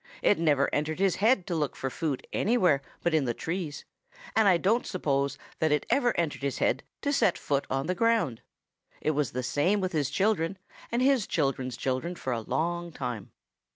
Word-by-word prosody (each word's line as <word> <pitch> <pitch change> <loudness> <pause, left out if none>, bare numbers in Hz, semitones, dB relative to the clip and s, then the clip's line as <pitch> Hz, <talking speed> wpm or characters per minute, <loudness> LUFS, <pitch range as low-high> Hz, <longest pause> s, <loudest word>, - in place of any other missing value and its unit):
It 205 - +4
never 145 -4 +3
entered 155 +1 0
his 195 -1 +2
head 210 -2 +3
to 175 - -2
look 150 -3 -1
for 130 - -3
food 150 -4 -3
anywhere 185 - +3 0.2
but 170 - +1
in 155 -4 +3
the 120 -2 -1
trees, 165 -3 -4 0.5
and 220 -2 +5
I 185 -3 +6
don't 215 +8 +1
suppose 140 -6 0 0.2
that 160 -1 +2
it 150 - +1
ever 245 -3 +2
entered 160 -5 -1
his 140 -1 -2
head - - +1 0.2
to 285 -1 +1
set 195 -9 +3
foot 140 -1 -1
on 135 +1 -1
the 180 - 0
ground. 215 - +1 0.6
It 155 - +1
was 150 -3 0
the 125 +1 -2
same 145 +11 +1
with 185 -1 -1
his 150 -5 0
children 190 +1 +1 0.3
and 240 +2 +1
his 265 -6 +3
children's 130 -5 -1
children 135 +8 -2
for 130 -6 -3
a 115 - -2
long 170 +7 -2
time. 120 -8 -5
160 Hz, 195 wpm, -28 LUFS, 140-190 Hz, 0.6 s, I